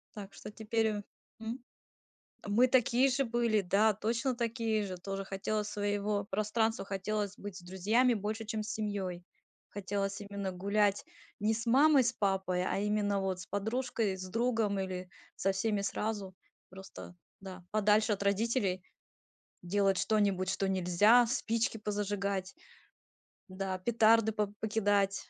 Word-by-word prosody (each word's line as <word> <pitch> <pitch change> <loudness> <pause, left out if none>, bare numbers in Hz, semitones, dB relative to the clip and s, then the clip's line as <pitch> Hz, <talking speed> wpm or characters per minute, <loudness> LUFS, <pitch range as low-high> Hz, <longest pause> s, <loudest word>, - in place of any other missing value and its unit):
Так, 200 -2 -9
что - - -9
теперь, 225 +1 -1
э 210 -1 -2 0.4
М? 230 +3 -5 0.8
Мы 220 +5 +4
такие 255 +1 +3
же 275 +2 +1
были. 230 -2 +1
Да, 205 +4 +3
точно 230 +5 -1
такие 230 -2 -1
же. 185 -2 -5
Тоже 195 +2 -5
хотелось 205 +2 -2
своего 205 0 -1
пространства, 215 +2 0
хотелось 205 +1 -3
быть 205 -2 -7
с - - -10
друзьями 205 +8 +2
больше, 215 +1 -3
чем 215 -1 -3
с 210 - -6
семьёй. 195 -5 -3 0.5
Хотелось 200 0 -3
именно 200 -1 -4
гулять 200 +2 +1 0.3
ни 215 +2 +2
с 230 +2 -4
мамой, 275 +3 +5
с 240 +1 0
папой, 190 -4 0
а 195 - -1
именно 205 -1 +1
вот 190 -1 -2
с - - -8
подружкой, 220 0 -1
с 185 - -7
другом 225 -2 0
или 185 -1 -4 0.3
со 195 - +1
всеми 200 +1 0
сразу. 200 -2 -3 0.3
Просто, 190 -1 -11 0.2
да, 185 -2 -9
подальше 215 +1 +3
от 200 0 -3
родителей 200 -2 0 0.8
делать 195 +1 +1
что-нибудь, 200 -4 +1
что 195 +1 0
нельзя. 190 +6 +5
Спички 230 -2 0
позажигать, 200 -2 -2 1.0
да, 185 0 -3
петарды 220 +1 +4
по 210 -1 0
покидать, 205 -2 +1
205 Hz, 140 wpm, -32 LUFS, 195-225 Hz, 1.0 s, мамой